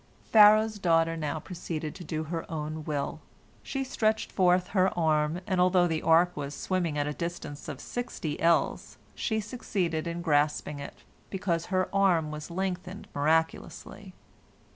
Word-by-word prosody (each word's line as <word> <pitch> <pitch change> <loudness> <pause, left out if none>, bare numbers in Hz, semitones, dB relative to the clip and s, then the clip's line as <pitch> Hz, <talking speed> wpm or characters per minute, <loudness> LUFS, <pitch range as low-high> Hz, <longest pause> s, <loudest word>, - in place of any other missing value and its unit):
Pharaoh's 215 0 +6
daughter 165 -2 +2
now 155 -1 -3
proceeded 160 -2 -5
to 180 - -9
do 155 -1 -3
her 165 +1 -5
own 155 0 -4
will. 145 -2 -3 0.4
She 270 -1 -3
stretched 220 -4 0
forth 180 -1 +3
her 190 -2 +3
arm, 155 +1 +1
and 185 -2 +1
although 180 0 +4
the 160 -2 -1
ark 170 +2 +4
was 145 -1 -5
swimming 175 -5 -1
at 145 - +1
a 150 - -2
distance 170 -3 -6
of 145 -4 -6
sixty 205 -11 -5
ells, 170 0 +1 0.2
she 220 -2 -1
succeeded 185 -8 -2
in 170 0 -4
grasping 150 -2 +1
it, 140 - -9 0.3
because 180 -4 -2
her 185 0 +1
arm 180 -6 +3
was 150 +1 -7
lengthened 185 +1 -4
miraculously. 160 +3 -1
170 Hz, 150 wpm, -28 LUFS, 155-185 Hz, 0.4 s, Pharaoh's